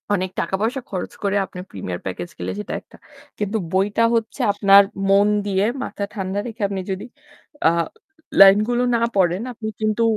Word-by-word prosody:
অনেক 185 0 -2
টাকা-পয়সা 225 +7 -1
খরচ 185 -3 -4
করে 200 0 +1
আপনি 180 - -10
প্রিমিয়ার 90 -2 -5
প্যাকেজ 90 -2 -5
গেলে 90 +1 -3
সেটা - - -5
একটা। - - -19 0.4
কিন্তু 210 +2 -1
বইটা 200 +4 +2
হচ্ছে 225 -1 -2
আপনার 200 0 +6 0.3
মন 200 +1 +5 0.2
দিয়ে 195 0 +1 0.2
মাথা 200 - -5
ঠান্ডা 195 -1 -3
রেখে 225 -1 -9
আপনি 195 -1 -3
যদি 195 +4 -4 0.6
আ - - +7 0.7
লাইন 195 0 +9
গুলো 245 +1 +1
না 230 - +1
পড়েন 180 +1 +2
আপনি 220 -1 -6
কিন্তু 215 +1 +1
200 Hz, 165 wpm, -21 LUFS, 185-215 Hz, 0.7 s, লাইন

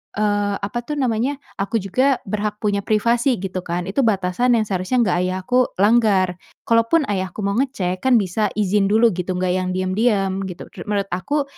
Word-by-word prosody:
eee, 205 -1 0
apa 205 +4 -2
tuh 300 - -2
namanya, 255 0 0 0.2
aku 200 +3 -2
juga 255 +8 +1
berhak 210 +1 -2
punya 205 -1 +1
privasi 235 +4 +2
gitu 190 -1 -3
kan. 175 +1 -2
Itu 200 - -2
batasan 205 +4 +1
yang 225 - +2
seharusnya 190 +6 0
enggak 185 -5 +1
ayahku 185 +7 0 0.2
langgar. 200 -5 +3 0.3
Kalaupun 230 +8 +3
ayahku 190 +1 -3
mau 200 - +1
ngecek, 190 -10 -1
kan 260 -1 +3
bisa 210 +1 0
izin 205 -1 +2
dulu 220 +3 +4
gitu 180 0 -3
enggak 180 0 0
yang 185 0 -2
diam-diam 195 0 0
gitu. 180 -2 -9
Ru - - -10
menurut 200 -1 -1
aku 235 +12 -1
205 Hz, 175 wpm, -21 LUFS, 185-230 Hz, 0.3 s, dulu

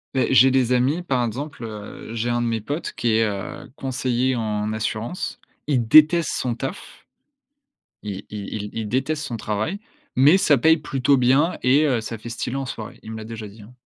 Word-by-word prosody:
Beh, 130 - +2
j'ai 130 +1 +7
des 125 -1 +2
amis, 140 +8 +1
par 130 -7 0
exemple, 130 +2 -5
heu, 110 +1 -8
j'ai 120 +2 -1
1 120 0 0
de 120 - 0
mes 115 -2 -1
potes 145 +9 -4
qui 120 - -1
est, 115 - +3
heu, 100 +2 -5
conseiller 130 -1 -1
en 105 -1 -2
assurance. 110 +8 -3 0.3
Il 125 -6 +1
déteste 155 +3 +6
son 120 -2 -1
taf. 135 +10 -7 1.0
Il 100 -1 -6
il 105 -2 -6
il 105 -1 -4
il 110 -2 -4
déteste 140 +5 -1
son 120 - -4
travail, 110 - -2 0.4
mais 145 +8 +7
ça 150 -9 +4
paye 160 +5 +5
plutôt 140 -2 +1
bien 135 +7 +3
et 140 +4 +4
heu, 125 -5 +1
ça 110 0 -6
fait 120 - -9
stylé 120 +2 -3
en 135 -1 -3
soirée. 110 -3 -7
Il 110 - -7
me - - -6
l'a 110 - -7
déjà 110 -1 -7
dit, 105 +1 -13
hein. 125 +5 -15
120 Hz, 205 wpm, -23 LUFS, 110-135 Hz, 1.0 s, j'ai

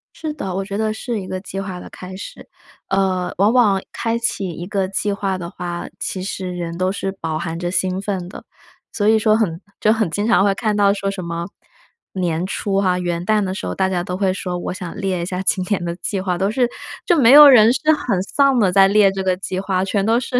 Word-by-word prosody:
是 310 -2 -4
的， 190 -11 -5
我 195 0 -2
觉 200 0 -4
得 215 0 0
是 230 0 -4
一 185 - -8
个 185 - -4
计 195 0 -7
划 190 -2 -5
的 - - -10
开 185 0 -9
始。 205 - -10 0.4
呃， 190 -2 0
往 205 +5 +3
往 210 -6 +4
开 230 0 -2
启 215 -5 -2
一 170 +1 -6
个 195 0 -1
计 200 +1 -1
划 195 -1 -2
的 170 -2 -6
话， 175 -1 -5
其 185 - -4
实 190 -1 -4
人 170 -1 -5
都 185 +1 0
是 195 0 -3
饱 165 -5 -4
含 165 0 -4
着 175 0 -2
兴 185 +1 0
奋 195 -3 -3
的。 185 - -10 0.5
所 205 - -1
以 220 0 +5
说 215 0 +3
很 180 -6 -1 0.2
就 215 - +3
很 220 -5 0
经 205 +6 -2
常 230 -4 +4
会 200 -1 +3
看 215 0 -1
到 200 -1 +4
说 195 -1 -2
什 195 -2 -6
么， 170 0 -4 0.7
年 175 -3 -1
初 195 0 -1
哈， 185 -2 +1
元 175 -1 -2
旦 215 +2 +2
的 185 -1 -2
时 195 - -5
候 - - -3
大 190 - +1
家 180 -2 -1
都 180 0 -4
会 190 -1 +1
说 180 -2 -4
我 175 - -4
想 180 -2 -7
列 190 -3 -2
一 - - -2
下 185 0 -3
今 185 0 +1
年 180 -2 -1
的 170 0 -3
计 195 +1 -3
划， 180 -2 -2
都 195 +1 +1
是， 245 +3 +1 0.4
就 350 - +3
没 255 -6 +5
有 295 +1 +11
人 230 -5 +7
是 255 - 0
很 235 -10 -1
丧 275 +4 +2
地 195 -5 +3
在 195 +1 +6
列 200 0 +4
这 195 0 -4
个 185 -1 +1
计 185 0 -4
划， 190 -1 -1
全 195 0 0
都 225 +3 +3
是 250 0 -2
195 Hz, 270 characters per minute, -20 LUFS, 180-210 Hz, 0.7 s, 有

